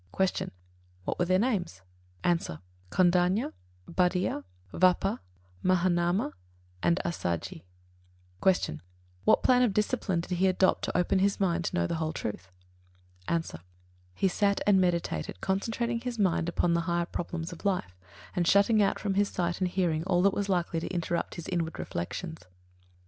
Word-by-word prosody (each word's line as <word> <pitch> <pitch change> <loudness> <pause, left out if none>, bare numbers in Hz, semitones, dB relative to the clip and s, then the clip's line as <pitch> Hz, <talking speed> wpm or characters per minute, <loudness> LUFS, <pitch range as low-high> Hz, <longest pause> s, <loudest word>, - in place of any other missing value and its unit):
53. 190 -1 +1
Q. - - -9 0.5
What - - -2
were 175 - +3
their 185 +1 +3
names? 190 - -1 0.4
A. 175 - +4 0.5
Kondañña, 180 - +2 0.3
Bhaddiya, 180 - +1 0.3
Vappa, 180 0 +3 0.4
Mahānāma, 175 -1 +2 0.5
and 170 +2 +2
Assaji. 90 - -3 0.8
54. 190 - +7
Q. 75 - -4 0.5
What - - +4
plan 250 -1 +5
of 230 -6 +2
discipline 210 -5 0
did 180 +1 -3
he 190 - +4
adopt 185 0 +2
to - - -1
open 180 +2 +2
his 200 +1 +2
mind 175 -3 +1
to - - -2
know 85 - +2
the - - -2
whole 160 0 -1
truth? 95 - -5 0.8
A. 170 -1 +1 0.7
He 195 - +2
sat 200 +2 +1
and 195 -2 +5
meditated, 170 - -1
concentrating 230 - -1
his 245 -1 -4
mind 175 -4 +1
upon 170 0 +1
the 170 - +2
higher 170 0 +1
problems 170 0 -4
of 170 - -12
life, 180 - -1 0.4
and 175 -1 +1
shutting 200 +3 +5
out 200 - +2
from 200 -2 -1
his 200 +1 +2
sight 175 0 -2
and 185 - +3
hearing 175 -4 0
all 180 -1 +2
that 200 0 +4
was 200 -1 -2
likely 175 -3 0
to - - -5
interrupt 170 -1 -2
his 170 - -7
inward 170 -3 -2
reflections. 160 - -5
180 Hz, 160 wpm, -29 LUFS, 170-195 Hz, 0.8 s, 54